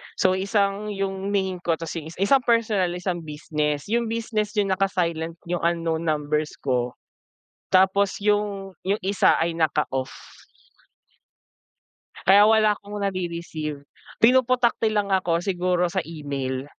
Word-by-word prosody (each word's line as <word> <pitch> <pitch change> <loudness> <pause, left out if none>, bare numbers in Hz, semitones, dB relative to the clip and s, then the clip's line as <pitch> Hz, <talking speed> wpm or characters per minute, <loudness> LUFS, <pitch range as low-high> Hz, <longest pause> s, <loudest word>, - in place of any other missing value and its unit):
So, 185 0 +2
isang 200 +1 0
yung 195 0 -3
main 190 -2 0
ko, 170 -1 0
tas 165 +1 -6
yung 160 - -6
is 165 - -10
isang 260 +5 +3
personal 215 -7 +2
isang 175 -2 -3
business. 150 +1 -3
Yung 235 +1 +1
business 220 -2 -2
yung 205 -2 +1
naka-silent 170 -4 -1
yung 175 -1 -1
unknown 165 -1 0
numbers 150 0 -1
ko. 125 -2 -1 0.8
Tapos 190 +1 +3
yung 205 -2 -1
yung 200 +3 0
isa 195 +1 +3
ay 165 0 0
naka-off. 150 -5 0 2.1
Kaya 200 +2 +7
wala 215 -1 +5
akong 205 +1 -9
nare-receive, 170 -6 -4 0.4
pinoputakti 245 -1 +3
lang 205 -2 0
ako 175 -3 +1
siguro 180 -2 +1
sa 190 - 0
email. 140 -5 -4
185 Hz, 130 wpm, -24 LUFS, 160-205 Hz, 2.1 s, Kaya